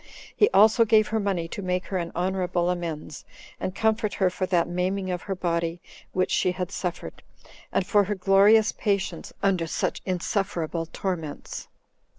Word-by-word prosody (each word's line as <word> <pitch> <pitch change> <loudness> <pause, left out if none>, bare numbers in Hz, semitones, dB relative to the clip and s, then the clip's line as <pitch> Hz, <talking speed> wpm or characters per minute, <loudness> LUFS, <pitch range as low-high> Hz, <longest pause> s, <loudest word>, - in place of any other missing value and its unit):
He 420 - +4
also 220 +3 +6
gave 215 -1 +4
her 220 - 0
money 190 -5 -1
to 200 - -5
make 180 -1 -1
her 190 - -2
an 170 -1 -4
honorable 180 -1 0
amends, 165 -4 -5 0.4
and 185 - -3
comfort 220 -1 +1
her 185 -2 +2
for 185 +1 -2
that 175 -3 +2
maiming 185 +2 -1
of 180 -1 -3
her 195 - -4
body 170 -1 -1 0.3
which 185 0 0
she 180 - +2
had 180 0 -4
suffered, 180 -2 -5 0.5
and 185 - +1
for 205 +1 +3
her 205 +2 -2
glorious 200 +3 +5
patience 195 -4 -2
under 185 -4 +2
such - - -2
insufferable 175 -3 -2
torments. 165 -5 -5
185 Hz, 160 wpm, -26 LUFS, 175-200 Hz, 0.5 s, also